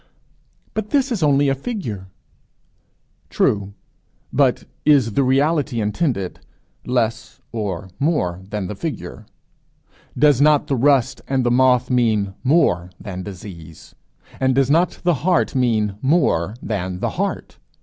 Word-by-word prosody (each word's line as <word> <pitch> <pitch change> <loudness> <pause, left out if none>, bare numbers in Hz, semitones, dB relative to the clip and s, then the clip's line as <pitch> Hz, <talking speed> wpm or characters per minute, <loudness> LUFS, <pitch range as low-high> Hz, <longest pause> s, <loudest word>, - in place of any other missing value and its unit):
"But 215 -1 -3
this 275 -2 +1
is 220 -6 -1
only 145 -1 +3
a 135 - +3
figure." 130 - -5 1.2
True. 100 -1 0 0.6
But - - +2 0.2
is 135 -7 +4
the 140 - +2
reality 140 0 +1
intended, 105 - -1 0.4
less 115 -2 -2
or 100 -4 -4
more 95 - 0
than 105 -2 -3
the 90 - -5
figure? 150 +9 -6 0.9
Does 145 -1 +4
not 150 -1 +4
the 140 - -1
rust 135 0 +2
and 135 -1 +1
the 120 - +2
moth 125 0 +3
mean 110 -5 +1
more 110 - +2
than 95 -3 -6
disease? 90 -4 -10 0.5
And 130 -1 +2
does 135 0 +2
not 170 +4 +2
the 175 0 +3
heart 180 +1 +2
mean 110 -6 0
more 130 - +1
than 95 -4 -3
the - - -1
heart? - - -4
125 Hz, 130 wpm, -20 LUFS, 100-145 Hz, 1.2 s, is